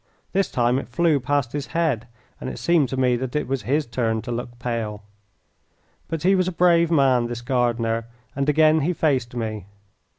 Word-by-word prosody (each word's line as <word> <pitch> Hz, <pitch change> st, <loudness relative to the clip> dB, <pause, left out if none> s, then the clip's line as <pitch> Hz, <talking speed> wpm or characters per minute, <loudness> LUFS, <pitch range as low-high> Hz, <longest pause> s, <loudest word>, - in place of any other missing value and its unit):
This 195 Hz, 0 st, +1 dB
time 120 Hz, +1 st, +1 dB
it 135 Hz, -, -8 dB
flew 155 Hz, +3 st, +2 dB
past 135 Hz, -1 st, 0 dB
his 145 Hz, -1 st, -4 dB
head, 135 Hz, -9 st, 0 dB, 0.3 s
and -, -, -5 dB
it -, -, -7 dB
seemed 170 Hz, -6 st, +2 dB
to 130 Hz, -, -4 dB
me 125 Hz, -1 st, +3 dB
that 130 Hz, +2 st, -5 dB
it 150 Hz, -, -1 dB
was 135 Hz, -1 st, -2 dB
his 145 Hz, +4 st, 0 dB
turn 115 Hz, -2 st, -1 dB
to 120 Hz, -, -5 dB
look 120 Hz, 0 st, -5 dB
pale. 115 Hz, -4 st, -4 dB, 1.0 s
But 165 Hz, -1 st, -4 dB
he 190 Hz, +2 st, +4 dB
was 185 Hz, -2 st, +2 dB
a -, -, 0 dB
brave 170 Hz, -1 st, +3 dB
man, 135 Hz, -6 st, +3 dB
this 120 Hz, 0 st, -5 dB
gardener, 120 Hz, -3 st, 0 dB, 0.3 s
and 140 Hz, +1 st, 0 dB
again 155 Hz, +1 st, +4 dB
he 160 Hz, +5 st, 0 dB
faced 130 Hz, -7 st, 0 dB
me. 110 Hz, -4 st, -4 dB
130 Hz, 195 wpm, -23 LUFS, 120-155 Hz, 1.0 s, he